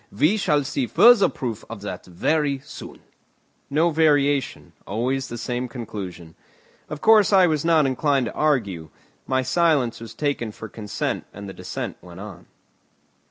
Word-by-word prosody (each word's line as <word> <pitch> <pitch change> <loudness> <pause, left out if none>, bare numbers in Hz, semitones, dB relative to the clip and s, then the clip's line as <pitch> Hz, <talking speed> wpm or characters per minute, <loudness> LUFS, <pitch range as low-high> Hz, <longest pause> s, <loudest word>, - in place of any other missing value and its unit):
We 150 - +2
shall 150 -8 +1
see 135 -2 -2
further 235 - +6
proof 115 -4 -5
of 115 -3 -8
that 100 -3 -7
very 140 - 0
soon." - - -10 0.7
No 160 +4 +2
variation, 145 -3 +1
always 130 +6 -1
the 120 - -6
same 125 +2 -3
conclusion. 100 -9 -7 0.6
Of 150 -1 -6
course, 215 -3 +5
I 190 -2 +6
was 155 -4 0
not 165 -3 +4
inclined 135 0 +1
to - - -5
argue. 100 - 0 0.4
My 130 0 +1
silence 140 -4 +1
was 115 - -9
taken 140 -7 -2
for 110 - -8
consent 105 -1 -4
and 100 0 -9
the 95 - -7
descent 90 0 -6
went 90 0 -12
on. 100 -4 -10
130 Hz, 155 wpm, -23 LUFS, 105-150 Hz, 0.7 s, further